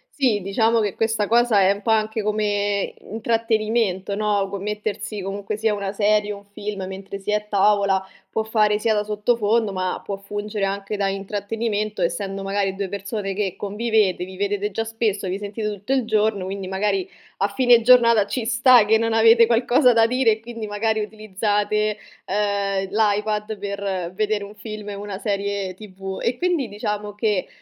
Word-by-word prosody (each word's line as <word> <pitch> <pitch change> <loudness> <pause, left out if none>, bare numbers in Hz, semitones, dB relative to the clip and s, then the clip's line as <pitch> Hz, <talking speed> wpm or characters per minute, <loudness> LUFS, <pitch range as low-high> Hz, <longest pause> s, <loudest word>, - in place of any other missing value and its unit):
sì 245 -8 +2
diciamo 220 +4 +2
che 205 -3 0
questa 220 -2 0
cosa 235 -2 +4
è 190 - +5
un 200 +1 -3
po' 225 - -3
anche 220 0 +1
come 205 -1 0
intrattenimento, 220 -3 0
no, 205 -2 +1
co 200 0 -5
mettersi 210 0 -4
comunque 200 +2 -4
sia 220 0 +1
una 200 -1 -3
serie 210 0 +2
o 205 - -5
un 200 - -16
film 205 -1 -6
mentre 190 +1 -7
si 200 +2 -3
è - - +3
a 210 - +2
tavola 200 -2 +2 0.2
può 220 - -1
fare 215 -1 +2
sia 220 +1 +1
da 210 0 +1
sottofondo 215 +1 +1
ma 185 -1 -2
può 200 -1 -4
fungere 205 0 -3
anche 200 +1 -3
da 200 -1 +1
intrattenimento, 205 +1 -3
essendo 195 +3 -2
magari 195 -1 -1
2 195 -1 -3
persone 200 0 -4
che 195 -2 -2
convivete, 210 -2 0
vi 185 0 -11
vedete 205 +1 -1
già 225 +3 -2
spesso, 220 -3 -1
vi 190 +2 -3
sentite 210 +1 -4
tutto 205 +5 -3
il 260 -2 +2
giorno, 215 -3 +1
quindi 195 0 -5
magari 195 -1 -1 0.3
a 200 - +1
fine 240 +3 +4
giornata 235 -3 +6
ci 245 0 -3
sta 245 -1 +6
che 220 +1 +4
non 230 0 0
avete 225 +1 +6
qualcosa 245 +2 +4
da 225 0 +5
dire 250 -1 +3
e 215 - -1
quindi 230 -2 -7
magari 220 +1 0
utilizzate, 210 0 -1 0.3
ehm, 200 -1 -1
l'iPad 210 0 0
per 200 -3 -3
vedere 210 +1 0
un 200 +1 -9
film 210 0 -7
o 200 - -6
una 205 -2 -5
serie 200 -2 -2
TV. 195 -1 -8
E 240 +1 0
quindi 345 -7 0
diciamo 210 0 -4
che 210 -3 0
210 Hz, 180 wpm, -22 LUFS, 200-220 Hz, 0.3 s, giornata